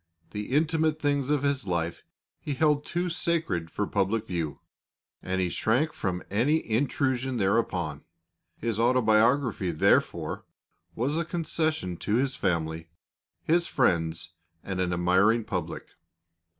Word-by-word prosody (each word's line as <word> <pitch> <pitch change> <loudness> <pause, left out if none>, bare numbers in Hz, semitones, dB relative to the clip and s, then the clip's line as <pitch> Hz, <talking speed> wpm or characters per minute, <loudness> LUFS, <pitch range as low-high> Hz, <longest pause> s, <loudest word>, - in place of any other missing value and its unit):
The 105 0 -4
intimate 155 +2 +2
things 145 -2 0
of 145 -2 +1
his 140 -6 0
life 85 -1 -1 0.4
he 145 - -4
held 150 0 +2
too 175 +1 -1
sacred 165 - -1
for 105 - -2
public 105 +3 0
view, 85 -7 -3 0.6
and 95 0 -2
he 90 -1 +1
shrank 125 - +1
from 90 -2 -3
any 135 +10 +2
intrusion 130 +1 0
thereupon. 95 -7 0 0.5
His 115 -2 -2
autobiography, 115 -2 +3
therefore, 80 - +1 0.5
was 135 +7 0
a 170 - +1
concession 155 - -1
to 105 - -1
his 135 +2 +1
family, 80 -3 -1 0.5
his 170 +2 +2
friends, 80 -1 +1 0.3
and 95 -1 -3
an 90 -1 0
admiring 95 +6 +3
public. 90 -5 -4
115 Hz, 125 wpm, -27 LUFS, 90-145 Hz, 0.6 s, autobiography